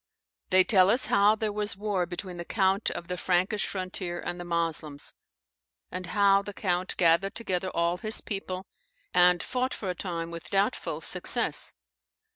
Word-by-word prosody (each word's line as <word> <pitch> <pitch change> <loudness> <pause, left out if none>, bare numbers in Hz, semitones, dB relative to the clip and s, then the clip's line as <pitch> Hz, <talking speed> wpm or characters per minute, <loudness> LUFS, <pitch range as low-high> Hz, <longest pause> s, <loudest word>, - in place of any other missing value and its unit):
] - - -58
They 185 0 +6
tell 185 -2 +5
us 245 +5 +5
how 205 +2 +5
there 220 -1 -2
was 210 -1 -1
war 200 -4 -1
between 180 0 -6
the 170 - -4
count 195 +2 +1
of 170 - -6
the 180 0 -3
Frankish 185 +4 +1
frontier 185 -2 -4
and 175 0 -5
the - - -5
Moslems, 165 -4 -1 0.8
and 185 0 -5
how 200 +1 +4
the 200 0 -8
count 180 -1 -1
gathered 170 +3 +3
together 190 -5 -2
all 170 0 0
his 215 +2 -3
people, 190 -2 -5 0.5
and 180 -1 +5
fought 255 +1 -1
for 190 -3 -3
a - - -3
time 170 -2 -4
with 170 -1 -8
doubtful 195 0 0
success. - - +1
185 Hz, 170 wpm, -28 LUFS, 175-200 Hz, 0.8 s, They